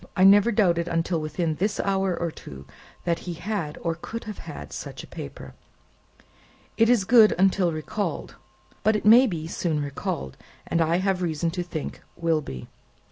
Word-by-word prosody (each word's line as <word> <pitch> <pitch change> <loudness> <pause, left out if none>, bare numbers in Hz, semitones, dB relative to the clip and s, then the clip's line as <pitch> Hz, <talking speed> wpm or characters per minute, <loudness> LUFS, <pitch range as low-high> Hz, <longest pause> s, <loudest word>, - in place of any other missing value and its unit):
I 185 - +4
never 205 +4 +7
doubted 175 -6 +2
until 165 0 0
within 155 +1 -2
this 205 +3 -1
hour 195 -2 0
or 170 -1 -1
two, 70 - -11 0.4
that 170 -1 0
he 175 -2 -6
had, 170 -4 -4
or 165 - -1
could 225 +8 -7
have 215 -1 -8
such - - -7
a - - -11
paper. - - -9 1.2
It 225 0 +4
is 235 -6 +3
good, 225 -1 +6
until 190 -1 +3
recalled. 155 +7 -4 0.5
But 220 0 +3
it 210 - -2
may 240 +5 +8
be 165 -7 -4
soon 165 -2 -2
recalled, 135 - -4 0.3
and, 170 - 0
I 165 +1 +2
have 190 0 0
reason 165 -1 -1
to 180 +1 -3
think, 170 -3 -6
will 165 -2 +1
be." 65 - -8
175 Hz, 170 wpm, -25 LUFS, 160-200 Hz, 1.2 s, may